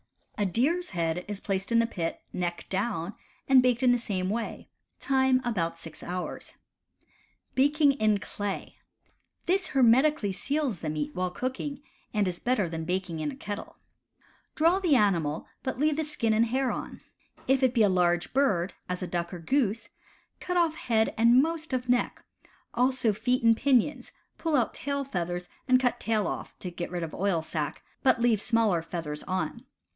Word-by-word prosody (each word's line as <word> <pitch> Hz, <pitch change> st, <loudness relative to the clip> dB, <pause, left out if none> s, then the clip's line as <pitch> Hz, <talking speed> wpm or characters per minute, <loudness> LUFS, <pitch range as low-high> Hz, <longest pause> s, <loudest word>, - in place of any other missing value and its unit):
A 205 Hz, -, 0 dB
deer's 300 Hz, -, +1 dB
head 170 Hz, -1 st, -1 dB
is 205 Hz, -1 st, -5 dB
placed 195 Hz, +1 st, -2 dB
in 230 Hz, -, +4 dB
the 230 Hz, -, +4 dB
pit, 170 Hz, -7 st, -4 dB
neck 175 Hz, -1 st, -3 dB
down, 195 Hz, -2 st, -1 dB, 0.3 s
and 265 Hz, -1 st, +7 dB
baked 250 Hz, 0 st, +2 dB
in 250 Hz, -, +6 dB
the 245 Hz, -, +3 dB
same 190 Hz, -5 st, -2 dB
way: 230 Hz, +1 st, -4 dB, 0.3 s
time 265 Hz, -1 st, +3 dB
about 170 Hz, -8 st, -1 dB
six 165 Hz, -2 st, -9 dB
hours. 180 Hz, +1 st, -5 dB, 1.0 s
Baking 290 Hz, +2 st, +4 dB
in 215 Hz, -6 st, +2 dB
Clay. 200 Hz, 0 st, -5 dB, 0.3 s
— -, -, -45 dB
This 375 Hz, +2 st, +1 dB
hermetically 260 Hz, -2 st, +4 dB
seals 255 Hz, -, -2 dB
the 155 Hz, -, -2 dB
meat 150 Hz, -1 st, -3 dB
while 180 Hz, 0 st, -1 dB
cooking, 260 Hz, +7 st, -4 dB, 0.3 s
and 210 Hz, -2 st, +1 dB
is 175 Hz, -1 st, -3 dB
better 240 Hz, -7 st, +1 dB
than 165 Hz, -1 st, -4 dB
baking 180 Hz, -2 st, -2 dB
in 155 Hz, -1 st, -1 dB
a -, -, -6 dB
kettle. 205 Hz, 0 st, -7 dB, 0.8 s
Draw 335 Hz, +4 st, +4 dB
the 345 Hz, -7 st, +3 dB
animal, 170 Hz, -, +1 dB, 0.2 s
but 260 Hz, -, -3 dB
leave 300 Hz, +2 st, +2 dB
the 315 Hz, -, +1 dB
skin 235 Hz, -7 st, 0 dB
and 225 Hz, +2 st, +3 dB
hair 260 Hz, +1 st, 0 dB
on. -, -, -6 dB, 0.5 s
If 265 Hz, +1 st, +3 dB
it 260 Hz, -1 st, +2 dB
be 225 Hz, -, +5 dB
a -, -, +6 dB
large 175 Hz, -1 st, +1 dB
bird, 200 Hz, -10 st, +2 dB, 0.2 s
as 180 Hz, +1 st, -3 dB
a -, -, -3 dB
duck 170 Hz, -1 st, -2 dB
or 180 Hz, -, -5 dB
goose, 230 Hz, -, 0 dB, 0.5 s
cut 360 Hz, 0 st, -2 dB
off 335 Hz, -3 st, +3 dB
head 225 Hz, -7 st, +1 dB
and 235 Hz, +4 st, +6 dB
most 325 Hz, -1 st, -3 dB
of 255 Hz, -1 st, -1 dB
neck, 245 Hz, 0 st, +1 dB, 0.5 s
also 250 Hz, -2 st, +2 dB
feet 250 Hz, +4 st, 0 dB
and 230 Hz, 0 st, +6 dB
pinions, 265 Hz, +2 st, +1 dB, 0.3 s
pull 325 Hz, -2 st, 0 dB
out 245 Hz, -5 st, +2 dB
tail 280 Hz, 0 st, -2 dB
feathers 175 Hz, -7 st, -3 dB, 0.2 s
and 255 Hz, -1 st, +5 dB
cut 250 Hz, -1 st, 0 dB
tail 220 Hz, -3 st, 0 dB
off -, -, -5 dB
(to 180 Hz, -, -6 dB
get 175 Hz, 0 st, -5 dB
rid 175 Hz, -1 st, -3 dB
of 160 Hz, -, -5 dB
oil 185 Hz, -4 st, 0 dB
sac), 155 Hz, -2 st, -4 dB, 0.2 s
but 260 Hz, -3 st, +4 dB
leave 230 Hz, -3 st, +3 dB
smaller 225 Hz, -8 st, +2 dB
feathers 160 Hz, -3 st, -5 dB
on. 185 Hz, +5 st, -3 dB
225 Hz, 180 wpm, -28 LUFS, 180-260 Hz, 1.0 s, and